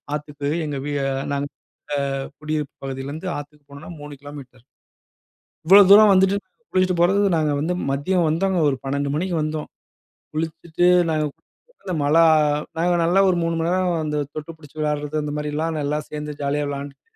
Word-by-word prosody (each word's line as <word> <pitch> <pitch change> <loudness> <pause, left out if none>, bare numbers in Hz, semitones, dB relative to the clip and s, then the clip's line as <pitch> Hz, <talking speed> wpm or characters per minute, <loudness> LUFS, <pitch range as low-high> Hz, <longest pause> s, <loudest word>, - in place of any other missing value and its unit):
ஆத்துக்கு 145 -1 -5 0.2
எங்க 145 -2 -3
வீ 145 - -3
நாங்க 135 0 -1
அ - - -5
நாங்க 140 0 -5 0.7
குடியிருப்பு 150 -1 -3
பகுதியிலேந்து 140 +6 -5
ஆத்துக்கு 145 0 -10
போனோம்னா 140 +4 -10
3 145 0 -8
கிலோமீட்டர். 135 -4 -11 1.0
இவ்வளோ 195 +4 +9
தூரம் 210 +1 +9
வந்துட்டு, 190 +1 +4 0.4
குளிச்சுட்டு 185 -1 +2
போறதுக்கு 195 +3 +3
நாங்க 155 -1 +1
வந்து 165 +4 -1 0.2
மதியம் 165 +6 +1
வந்தோங்க. 185 +4 0
ஒரு 135 - 0
12:00 140 +1 -2
மணிக்கு 175 +2 -1
வந்தோம். 155 0 -3 0.7
குளிச்சுட்டு 160 +2 -2 0.2
நாங்க 155 -1 +1 0.6
அந்த 185 - -3
மழை 155 +4 +4 0.6
நாங்க 175 +2 +2
நல்லா 175 +3 +3
ஒரு 185 - +2
3 165 0 0
மணி 165 - 0
நேரம் 180 -3 +1
அந்த 150 -1 -2 0.2
தொட்டு 155 +2 -6
பிடுச்சு 155 -1 -17
விளையாடுறது, 150 0 -1
அந்த 150 - -4
மாரிலாம் 155 +2 -2
நல்லா 145 +1 -1
சேர்ந்து 150 0 -5
ஜாலியா 145 +1 0
விளையாண்டுட்டு, 140 0 -6
150 Hz, 155 wpm, -22 LUFS, 145-170 Hz, 1.0 s, இவ்வளோ